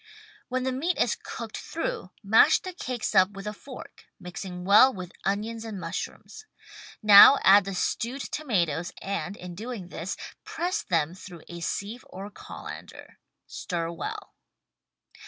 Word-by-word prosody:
When 255 0 -1
the 260 - 0
meat 315 +8 -1
is - - +2
cooked - - -7
through - - -4
mash 220 +10 +6
the 370 - -7
cakes 250 -11 -3
up 185 -1 +6
with 195 0 -8
a 210 - -3
fork 255 +4 -12
— - - -55
mixing 180 0 -7
well 210 +7 +7
with 185 -5 -8
onions 220 +3 -1
and 220 -4 -6
mushrooms. 435 - -6 0.6
Now 210 +6 +10
add 200 0 +7
the 195 -1 -4
stewed 245 +8 -2
tomatoes 175 - -1
and, 200 +1 -4
in 180 -1 -8
doing 210 -1 -7
this, 175 +1 -5 0.3
press 365 +5 -2
them 165 - 0
through 180 -3 -11
a 170 - -8
sieve 205 +7 -4
or 195 +2 -8
colander. - - -10 0.3
Stir 170 -2 -4
well. 170 - -6
200 Hz, 150 wpm, -27 LUFS, 180-250 Hz, 0.6 s, Now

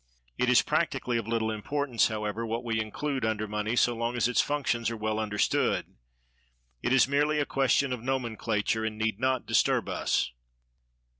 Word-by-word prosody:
It - - +1
is - - +5
practically 120 -1 0
of 115 - -6
little 115 -1 0
importance, 125 +3 0
however, 110 0 -3
what 115 +1 -3
we 115 -2 -1
include 135 +4 -3
under 110 -1 -1
money, 105 +2 -2
so 120 0 +3
long 115 +1 -2
as 115 - +3
its 125 - +3
functions 125 -6 -1
are 115 - -5
well 110 0 -1
understood; 105 -1 0 0.9
it - - -1
is 130 -2 +5
merely 150 +2 +2
a 145 - +1
question 135 0 +2
of 125 - -5
nomenclature, 115 -4 -1
and 110 -1 -3
need 110 -1 -1
not 130 0 0
disturb - - +2
us. - - 0
115 Hz, 170 wpm, -28 LUFS, 110-130 Hz, 0.9 s, is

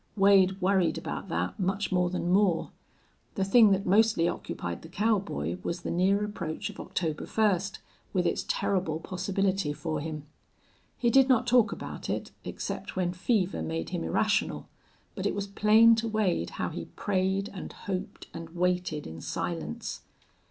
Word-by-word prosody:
Wade 195 -1 +5
worried 185 -2 +2
about - - -5
that 85 +2 -2
much 195 +2 -1
more 180 -1 +2
than 175 -1 -2
Moore. 190 -3 +2 0.6
The 195 - 0
thing 215 +3 +6
that 195 0 +1
mostly 210 -2 +4
occupied 85 - -4
the 160 - -11
cowboy 190 - 0
was 170 - -3
the - - -4
near 195 +4 +2
approach 175 -7 -4
of - - -14
October 160 -4 -3
first, 200 -3 +1 0.3
with - - +1
its - - 0
terrible 185 - 0
possibility 190 -2 -1
for 155 0 -3
him. 155 -1 -5 0.7
He 240 -2 +2
did 270 +1 +5
not 255 -1 +4
talk 240 -2 +4
about - - -6
it, - - -3
except - - -5
when 180 -2 0
fever 190 0 0
made 165 0 -3
him 175 -2 -2
irrational, 215 -1 0 0.5
but - - -2
it - - -1
was 200 -1 -2
plain 215 +3 +6
to 225 +1 -1
Wade 205 - 0
how - - -1
he - - -6
prayed 190 0 0
and 185 - -7
hoped 185 -2 -5
and 165 0 -7
waited 180 -4 0
in 80 +1 -8
silence. - - -4
190 Hz, 160 wpm, -28 LUFS, 170-205 Hz, 0.7 s, thing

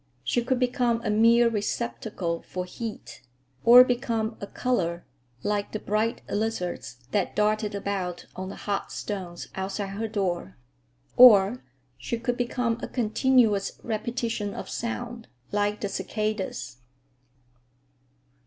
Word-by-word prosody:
She 240 - +1
could 255 +1 +1
become 245 -2 +1
a 215 - +1
mere 230 +2 +5
receptacle 210 -5 -2
for 180 0 -5
heat, 220 +4 -7 0.4
or 245 +2 +10
become 230 -3 -1
a 200 - -4
color, 175 -10 -1 0.4
like 205 -1 -1
the 215 - -2
bright 215 +3 -1
lizards 180 - -3
that 200 -3 0
darted 210 0 +1
about 190 -3 -3
on 185 0 -5
the - - -7
hot 200 -1 -3
stones 185 -4 -5
outside 195 +1 -3
her 210 +3 -3
door; 185 - -2 0.6
or 225 -1 +8 0.4
she 125 - -3
could 240 +1 -1
become 240 -1 -1
a - - -3
continuous 230 -3 +2
repetition 225 -2 -2
of - - -6
sound, 235 0 -4 0.2
like 205 +1 0
the 205 - 0
cicadas. 210 - -3
215 Hz, 125 wpm, -26 LUFS, 195-235 Hz, 0.6 s, or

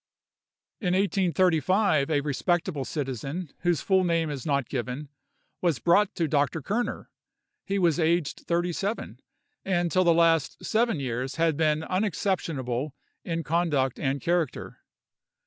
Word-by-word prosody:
In 180 -4 0
1835, 185 -3 +2
a 145 -2 +2
respectable 150 +1 -1
citizen, 140 +3 -4
whose 175 -4 +1
full 190 -1 +3
name 165 -3 +1
is 140 +1 -5
not 140 -4 +1
given, 130 +3 -4 0.5
was 170 -6 +2
brought 175 - +3
to 165 - 0
Dr. 145 +2 +1
Kerner. 235 - -2 0.6
He 200 0 0
was 175 -3 +2
aged 165 -1 +1
thirty 175 +1 0
seven, 200 +6 -3 0.4
and 175 -3 0
till 185 - +3
the 170 - +5
last 165 -2 +2
seven 230 -6 +1
years 130 0 -3
had 165 -2 +2
been 155 0 +1
unexceptionable 160 - -1 0.3
in 165 -1 -3
conduct 155 -6 0
and 135 0 -1
character. 170 -2 -1
165 Hz, 130 wpm, -27 LUFS, 145-180 Hz, 0.6 s, the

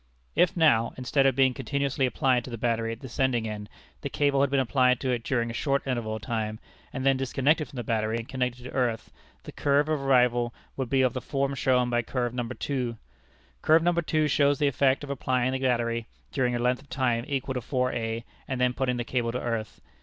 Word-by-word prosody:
If 180 0 +3
now, 115 -9 +4
instead 135 +2 +2
of 135 - +2
being 130 -1 +4
continuously 140 0 -1
applied 125 -2 +1
to - - -8
the 115 - -5
battery 115 0 0
at 115 - -7
the 130 - -7
sending 125 -3 0
end, 105 -1 -6 0.3
the - - -3
cable 140 -2 +2
had 140 - +3
been 140 0 +2
applied 125 -1 +3
to 130 - 0
it 120 -2 -1
during 120 -3 0
a - - -7
short 140 +2 0
interval 120 -5 -2
of 110 - -8
time, 110 -1 -2 0.3
and 130 -1 -4
then 135 -1 +4
disconnected 135 +4 +1
from 135 - -12
the 120 - -2
battery 110 0 0
and 115 0 -6
connected 125 -2 -2
to 125 - -8
earth, 125 -4 -1 0.3
the - - -8
curve 145 +1 +2
of 155 -3 0
arrival 125 -3 +3 0.2
would 130 -3 -3
be 135 0 +3
of 130 - +2
the 130 - -3
form 140 0 -1
shown 125 -2 +2
by 120 0 +2
curve 120 0 -2
No. 120 -2 -3 0.2
II. 125 -4 -1 0.7
Curve 160 +1 +5
No. 175 +1 +3 0.2
II. 155 -1 +3
shows 145 -1 +3
the 145 - +2
effect 135 +1 +2
of 140 - -5
applying 130 -1 0
the 130 - -2
battery 120 -3 0 0.2
during 125 -3 0
a - - +1
length 125 +2 +1
of 140 - -21
time 125 -3 0
equal 135 -2 -2
to 125 - -3
4_a_, 120 -3 -1 0.2
and 130 -1 -3
then 125 0 +2
putting 125 -1 -1
the 120 - -1
cable 120 -1 -1
to 125 - -3
earth. 115 -3 -4
125 Hz, 230 wpm, -27 LUFS, 120-135 Hz, 0.7 s, Curve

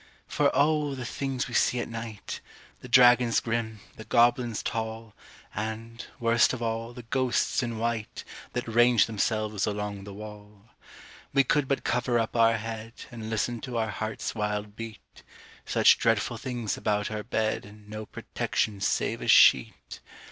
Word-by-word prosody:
For - - +2
O! 150 -1 +2
the 130 -2 -6
things 135 +1 -3
we 125 - -9
see 125 +1 +2
at - - -3
night 115 -2 -6 0.4
The - - -10
dragons 125 -1 +6
grim, 115 -2 -3 0.2
the 110 - -8
goblins 120 -1 +2
tall, 110 -1 -4 0.4
And, 110 +2 -5 0.2
worst 115 0 +3
of 125 - -5
all, 115 +1 -2
the 120 0 -10
ghosts 130 +3 0
in 120 -2 -3
white 115 -1 -3 0.3
That 125 - -3
range 120 -2 +5
themselves 110 -2 -1
along 105 -1 -4
the 100 - -8
wall! 105 0 -11 0.6
We 140 0 +5
could 145 +1 +1
but 140 - -1
cover 125 0 +1
up 115 0 -1
our 115 0 +4
head, 115 +1 -6 0.2
And 110 -2 -7
listen 115 +1 -1
to 125 -3 -4
our 110 -2 0
heart's 110 +1 -4
wild 105 -1 -3
beat 115 -1 -10 0.5
Such - - +5
dreadful 115 +1 +1
things 120 -5 -3
about 105 0 -1
our 105 -1 -3
bed, 110 0 -1
And 105 0 -15
no 110 0 -7
protection 100 0 -2
save - - 0
a - - -5
sheet! 65 - +4
115 Hz, 160 wpm, -27 LUFS, 110-120 Hz, 0.6 s, dragons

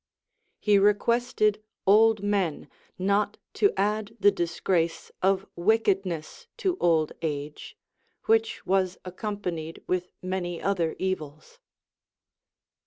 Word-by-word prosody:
He 205 -2 +4
requested 215 +1 +2 0.2
old 215 +1 +5
men 195 -6 0 0.3
not 200 +2 +1 0.2
to 405 - +3
add 210 +3 -1
the 205 0 +6
disgrace 170 -2 -1
of 195 +1 +2
wickedness 195 - 0
to 375 -3 0
old 160 -3 +2
age, 150 -2 -5 0.5
which 225 0 +1
was 190 -1 +1
accompanied 180 -4 -5
with 180 0 -2
many 180 -2 -3
other 175 -5 0
evils. 185 - -4
195 Hz, 100 wpm, -27 LUFS, 175-210 Hz, 0.5 s, the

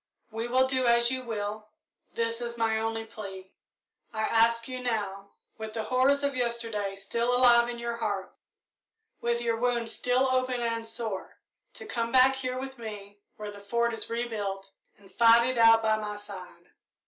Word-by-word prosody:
We 225 +2 -3
will 255 +2 +3
do 260 -1 +1
as 235 +1 +4
you 260 0 -1
will 215 -2 -5 0.5
this 230 0 -1
is 235 0 -4
my 225 -1 +1
only 225 0 -2
plea. 195 -4 -9 0.6
I 220 - -3
ask 230 +1 +3
you 255 -1 -5
now, 200 -5 -3 0.3
with 220 0 -6
the 220 - -2
horrors 260 +5 +2
of 280 -1 0
yesterday 230 -5 -2
still 235 +5 -1
alive 240 -1 +5
in 240 - -5
your 235 0 -4
heart, 200 -4 -3 0.9
with 235 0 0
your 230 -1 0
wound 240 -1 0
still 250 +2 +1
open 255 -1 +1
and 230 -1 -2
sore, 225 -4 -5 0.4
to - - -8
come 230 -1 -2
back 260 +1 +6
here 255 -1 -3
with 265 0 -6
me, 205 -2 -8 0.2
when 210 -1 -6
the 205 - -11
Fort 235 +3 0
is 225 - -4
rebuilt, 205 -5 -3 0.3
and 195 -1 -20
fight 235 +1 +6
it 255 -2 -1
out 225 0 +7
by 220 0 +3
my 210 -1 -4
side. 185 -4 -10
230 Hz, 175 wpm, -28 LUFS, 215-240 Hz, 0.9 s, out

